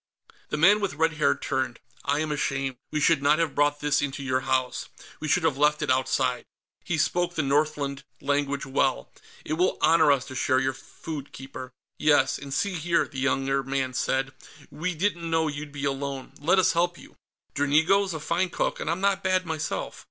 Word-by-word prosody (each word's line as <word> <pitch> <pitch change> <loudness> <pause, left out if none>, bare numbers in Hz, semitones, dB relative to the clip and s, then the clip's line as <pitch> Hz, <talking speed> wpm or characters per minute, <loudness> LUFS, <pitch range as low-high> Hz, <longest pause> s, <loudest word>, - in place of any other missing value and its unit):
The - - -2
man 195 +7 +6
with 200 -8 -2
red 160 +1 +2
hair 155 - +2
turned. 130 -3 -2 0.2
"I 145 +1 +1
am 155 -1 -2
ashamed. 135 -3 -1
We 150 - -1
should 150 -1 +3
not 145 +2 +4
have 165 -4 0
brought 145 0 +1
this 145 0 +2
into 140 0 -3
your 130 -1 +1
house; 130 -1 -1 0.3
we 155 - -4
should 180 +3 +2
have 145 -4 +1
left 150 +1 +3
it 145 - +1
outside." 130 -1 +1 0.4
He 170 - -1
spoke 175 +2 0
the 155 - 0
Northland 140 -1 0 0.2
language 140 -1 -1
well, 130 - 0 0.3
"It 155 - -2
will 185 - +2
honor 160 -1 +5
us 135 -3 +1
to 130 - -9
share 130 0 +2
your 130 0 +1
food, 145 +2 -8
Keeper." 130 -1 -9 0.3
"Yes, 150 -1 +3
and 140 -1 -9
see 185 +6 -1
here," 170 +1 +1
the 135 - -7
younger 135 0 +1
man 135 -1 -2
said, 135 +1 -1 0.4
"we 170 +4 -3
didn't 170 -1 -1
know 160 -1 +2
you'd 145 0 -5
be 145 0 -4
alone. 135 -1 -3
Let 165 +6 +3
us 185 - +4
help 175 0 +1
you. - - -15 0.4
Dranigo's 160 +6 +2
a - - -4
fine 175 +4 0
cook, - - -1
and - - -3
I'm 170 +3 -1
not 195 -1 +1
bad, 185 0 +1
myself." 160 -1 -3
145 Hz, 195 wpm, -26 LUFS, 135-165 Hz, 0.4 s, man